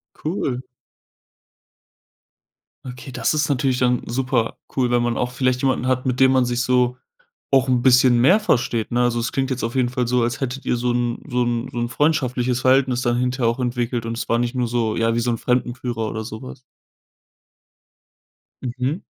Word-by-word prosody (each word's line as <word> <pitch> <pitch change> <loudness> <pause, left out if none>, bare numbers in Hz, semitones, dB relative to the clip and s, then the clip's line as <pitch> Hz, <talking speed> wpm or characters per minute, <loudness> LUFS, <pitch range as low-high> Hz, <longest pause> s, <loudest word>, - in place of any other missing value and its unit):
Cool. 145 -6 -3 2.2
Okay, 125 +1 -8
das 155 - 0
ist 150 -1 +1
natürlich 135 -2 +1
dann 125 -1 +2
super 125 -1 -1 0.2
cool, 125 -2 +1
wenn 120 0 +2
man 120 -1 0
auch 125 0 -1
vielleicht 125 0 0
jemanden 130 -2 0
hat, 130 0 0
mit 125 0 -1
dem 130 0 +6
man 130 -2 +3
sich 120 0 -1
so 125 0 +1 0.5
auch 135 -1 +4
'n 125 -1 +2
bisschen 125 -2 +5
mehr 180 - +5
versteht, 120 - 0
ne? 120 +1 +2
Also, 120 -1 +1
es 115 - -2
klingt 135 -1 -1
jetzt 125 -3 -2
auf 115 +3 -3
jeden 125 -2 +2
Fall 125 -2 -2
so, 125 -1 +2
als 120 +3 -2
hättet 135 +1 -4
ihr 120 - +1
so 120 0 0
'n 120 -1 -1
so 125 -2 0
'n 120 +1 -2
so - - -8
'n 120 0 -1
freundschaftliches 130 -4 0
Verhältnis 130 -1 +3
dann 120 -1 +1
hinterher 125 -1 0
auch 115 - -3
entwickelt 120 -1 -2
und 115 0 -4
es - - -4
war 115 - +2
nicht 120 +1 -2
nur 125 -2 0
so 115 -2 -1
ja, 115 0 +1
wie - - +1
so 120 +1 -1
'n 115 - -1
Fremdenführer 120 -2 -2
oder 110 0 -4
so 110 -1 -8
was. 65 - -10 2.0
Mhm 130 +6 -3
125 Hz, 195 wpm, -21 LUFS, 120-130 Hz, 2.2 s, dem